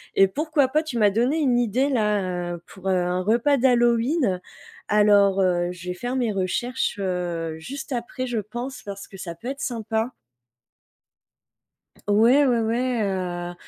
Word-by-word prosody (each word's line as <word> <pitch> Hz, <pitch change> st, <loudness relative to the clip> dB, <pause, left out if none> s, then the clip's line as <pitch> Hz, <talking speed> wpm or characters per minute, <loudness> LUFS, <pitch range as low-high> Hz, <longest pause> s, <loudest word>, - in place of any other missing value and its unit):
et 195 Hz, -, +6 dB
pourquoi 295 Hz, +5 st, +1 dB
pas, 305 Hz, +3 st, +2 dB
tu 310 Hz, -7 st, -5 dB
m'as 205 Hz, -2 st, +4 dB
donné 245 Hz, +9 st, +1 dB
une 255 Hz, -6 st, +2 dB
idée 245 Hz, +4 st, +1 dB
là, 195 Hz, -7 st, 0 dB
heu, 170 Hz, -, -8 dB
pour, 190 Hz, 0 st, -10 dB
heu, -, -, +3 dB
un 180 Hz, 0 st, 0 dB
repas 235 Hz, +8 st, +2 dB
d'Halloween. 240 Hz, -, +2 dB, 0.5 s
Alors, 205 Hz, -2 st, +4 dB
heu, 175 Hz, -1 st, +1 dB
je 180 Hz, 0 st, -8 dB
vais 180 Hz, -, -1 dB
faire 245 Hz, +7 st, -4 dB
mes 240 Hz, -4 st, 0 dB
recherches, 200 Hz, +6 st, -1 dB
heu, 175 Hz, -4 st, -2 dB
juste 275 Hz, -, -7 dB
après, 245 Hz, +1 st, -3 dB
je 240 Hz, -3 st, -2 dB
pense 240 Hz, +6 st, -6 dB
parce 200 Hz, -1 st, -8 dB
que 195 Hz, -, -12 dB
ça 170 Hz, -2 st, -6 dB
peut 240 Hz, +9 st, -7 dB
être 275 Hz, 0 st, -5 dB
sympa. 225 Hz, 0 st, -2 dB, 2.0 s
Ouais, 235 Hz, +8 st, +5 dB
ouais, 245 Hz, -3 st, +2 dB
ouais, 240 Hz, +1 st, 0 dB
heu, 175 Hz, -2 st, -3 dB
220 Hz, 160 wpm, -24 LUFS, 185-250 Hz, 2.0 s, et